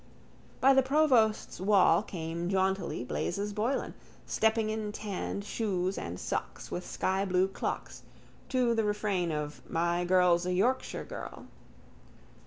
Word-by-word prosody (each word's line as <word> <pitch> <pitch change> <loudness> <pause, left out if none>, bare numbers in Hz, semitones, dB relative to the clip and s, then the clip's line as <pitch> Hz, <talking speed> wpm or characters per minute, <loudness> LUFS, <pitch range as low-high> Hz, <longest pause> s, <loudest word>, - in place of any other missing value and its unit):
By 270 +1 +6
the 270 - +6
provost's 260 -6 +2
wall 195 -1 +5
came 170 -3 -4
jauntily 190 -7 0
Blazes 200 +10 -2
Boylan, 230 +6 -1 0.3
stepping 220 0 +1
in 215 -1 -3
tan 205 -1 -4
shoes 195 -3 -1
and 85 +1 -5
socks - - -4
with 180 - -3
skyblue 190 0 0
clocks - - -4 0.5
to 250 -3 +2
the 225 -1 +1
refrain 205 -4 0
of 150 -1 -4
_My 175 +1 0
girl's 180 -1 +4
a 180 - 0
Yorkshire 245 +8 0
girl. - - -8
195 Hz, 125 wpm, -30 LUFS, 180-220 Hz, 0.5 s, By